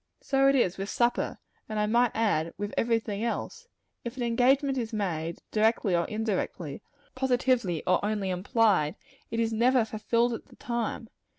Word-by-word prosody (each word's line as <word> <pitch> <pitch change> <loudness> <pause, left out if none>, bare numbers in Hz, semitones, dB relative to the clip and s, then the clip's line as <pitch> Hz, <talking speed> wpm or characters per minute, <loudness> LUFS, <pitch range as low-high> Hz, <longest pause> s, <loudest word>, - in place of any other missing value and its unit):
So 270 0 +2
it 275 - +5
is 195 -8 +1
with 195 +1 -3
supper; 240 0 0 0.3
and 215 - -3
I 210 - +2
might 235 +3 +3
add, 170 -8 0
with 205 +1 -4
every 230 0 +2
thing 210 -1 -4
else. 470 - -3 0.4
If 235 +2 -6
an 250 - -2
engagement 260 +4 +3
is 225 -2 -3
made, 170 -6 -3
directly 215 -3 +2
or 170 0 +1
indirectly, 205 -7 -3 0.3
positively 250 - +1
or 185 +1 +2
only 205 -2 -1
implied, 190 - +2 0.3
it 230 - -2
is 225 -1 +1
never 240 +1 +3
fulfilled 230 +2 0
at 230 - -7
the - - -17
time. 235 -1 -3
225 Hz, 170 wpm, -28 LUFS, 200-240 Hz, 0.4 s, it